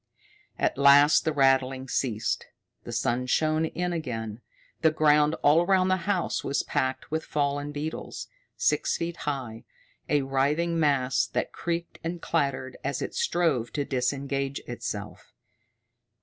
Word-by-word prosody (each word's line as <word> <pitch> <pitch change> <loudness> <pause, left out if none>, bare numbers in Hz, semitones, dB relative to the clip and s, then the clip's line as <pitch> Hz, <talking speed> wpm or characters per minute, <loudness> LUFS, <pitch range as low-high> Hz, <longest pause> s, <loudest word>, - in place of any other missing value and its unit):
At - - 0
last 145 +2 +6
the 160 - +2
rattling 135 -2 +2
ceased. 115 -4 -1 0.4
The - - -6
sun 125 +2 -1
shone 155 +4 +2
in 175 +2 -2
again. 115 -8 -4 0.4
The 160 - +5
ground 150 0 +3
all 150 +3 +6
around 185 +1 +3
the 185 - +3
house 185 -4 0
was 140 - 0
packed 130 -2 -2
with 160 0 -1
fallen 145 -1 -1
beetles, 150 +2 -5 0.3
six - - +1
feet 170 0 -4
high, 130 -7 -4 0.5
a 145 -2 +2
writhing 150 +6 +1
mass 135 -4 +2
that - - -2
creaked 170 0 -4
and 170 +1 -3
clattered 135 -4 -1
as - - -2
it - - -5
strove 165 - 0
to 145 -2 -1
disengage 135 +1 -1
itself. - - -6
145 Hz, 135 wpm, -27 LUFS, 135-160 Hz, 0.5 s, last